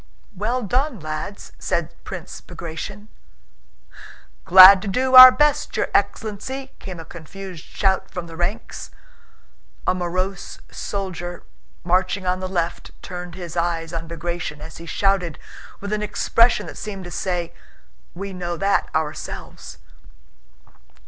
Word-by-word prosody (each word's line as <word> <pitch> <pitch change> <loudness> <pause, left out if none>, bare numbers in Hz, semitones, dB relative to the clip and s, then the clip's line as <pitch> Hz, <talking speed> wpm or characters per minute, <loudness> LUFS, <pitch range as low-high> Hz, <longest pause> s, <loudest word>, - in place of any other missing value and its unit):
"Well 235 +6 -1
done, 250 +3 0
lads!" 155 +5 -6
said - - -2
Prince - - -8
Bagratión. 185 +5 -7 1.4
"Glad 185 +1 +10
to 200 - -6
do 255 +6 0
our 255 0 +14
best, 295 +2 +1
your - - 0
ex'len 215 -2 0
lency!" 265 +4 -6
came 185 -3 -8
a 165 - -8
confused 175 +2 -9
shout 190 -1 0
from 180 -2 -6
the 165 -1 -10
ranks. 175 +6 -4 1.0
A - - +3
morose 185 +1 -3
soldier 175 -3 -5 0.4
marching 185 +2 +1
on 180 0 0
the 185 0 -4
left 175 -2 -3
turned 180 -2 -7
his 175 -3 -7
eyes 170 -1 -1
on 165 0 -4
Bagratión 170 -2 -4
as 160 +2 -10
he 170 - -10
shouted, 190 -1 0 0.4
with 200 +1 -4
an 210 - -1
expression 230 +3 +2
that - - -9
seemed 200 -3 -6
to 175 - -8
say: 175 -3 -2 0.6
"We 195 +2 -6
know 175 -1 -4
that 195 +2 +1
ourselves!" 155 -1 -5
185 Hz, 135 wpm, -22 LUFS, 170-200 Hz, 1.4 s, our